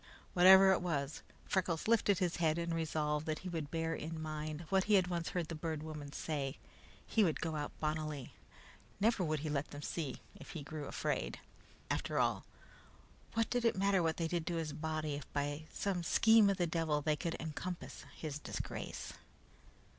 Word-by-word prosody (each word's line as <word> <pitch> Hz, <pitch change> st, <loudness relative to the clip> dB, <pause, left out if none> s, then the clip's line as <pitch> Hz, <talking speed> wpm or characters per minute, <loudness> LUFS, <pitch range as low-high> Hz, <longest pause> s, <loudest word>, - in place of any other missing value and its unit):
Whatever 190 Hz, +1 st, +9 dB
it 190 Hz, -, +3 dB
was, 150 Hz, -5 st, -2 dB, 0.2 s
Freckles 180 Hz, -3 st, 0 dB
lifted 215 Hz, -4 st, +4 dB
his 175 Hz, -2 st, 0 dB
head 160 Hz, -2 st, +2 dB
and 170 Hz, 0 st, -1 dB
resolved 155 Hz, -2 st, -1 dB
that 155 Hz, -1 st, 0 dB
he -, -, -2 dB
would 160 Hz, -4 st, -3 dB
bear 165 Hz, 0 st, -1 dB
in 160 Hz, 0 st, -4 dB
mind 155 Hz, 0 st, -4 dB
what 190 Hz, -1 st, +3 dB
he 210 Hz, -, +5 dB
had 190 Hz, -2 st, +5 dB
once 175 Hz, -2 st, -2 dB
heard 175 Hz, -4 st, -2 dB
the 165 Hz, -, -5 dB
Bird 155 Hz, -1 st, -3 dB
Woman 150 Hz, -2 st, -6 dB
say. 140 Hz, -2 st, -3 dB, 0.5 s
He 220 Hz, -, +3 dB
would 165 Hz, -5 st, +1 dB
go 160 Hz, -1 st, -2 dB
out 145 Hz, -1 st, -4 dB
bonnily. 155 Hz, -3 st, -2 dB, 0.7 s
Never 220 Hz, -2 st, +3 dB
would 155 Hz, -3 st, 0 dB
he 155 Hz, -, -2 dB
let 145 Hz, 0 st, 0 dB
them 145 Hz, 0 st, -8 dB
see, 145 Hz, -5 st, -3 dB
if -, -, -11 dB
he 160 Hz, -, -5 dB
grew 150 Hz, 0 st, -6 dB
afraid. -, -, -2 dB, 0.5 s
After -, -, -1 dB
all, -, -, +1 dB, 0.9 s
what 225 Hz, 0 st, +1 dB
did 245 Hz, -1 st, +1 dB
it 230 Hz, -4 st, +3 dB
matter 195 Hz, -1 st, +3 dB
what 160 Hz, -1 st, +1 dB
they 165 Hz, -, 0 dB
did 170 Hz, -1 st, -2 dB
to 175 Hz, -, 0 dB
his 160 Hz, -3 st, -2 dB
body 155 Hz, 0 st, -2 dB
if 145 Hz, 0 st, -6 dB
by 145 Hz, +2 st, -2 dB
some 195 Hz, -3 st, -1 dB
scheme 220 Hz, +5 st, +6 dB
of 195 Hz, -, +1 dB
the 175 Hz, -, +2 dB
devil 160 Hz, -3 st, 0 dB
they 155 Hz, 0 st, +2 dB
could 170 Hz, +2 st, -2 dB
encompass 160 Hz, +3 st, -5 dB
his 150 Hz, -2 st, -4 dB
disgrace? -, -, -5 dB
160 Hz, 190 wpm, -35 LUFS, 150-180 Hz, 0.9 s, Whatever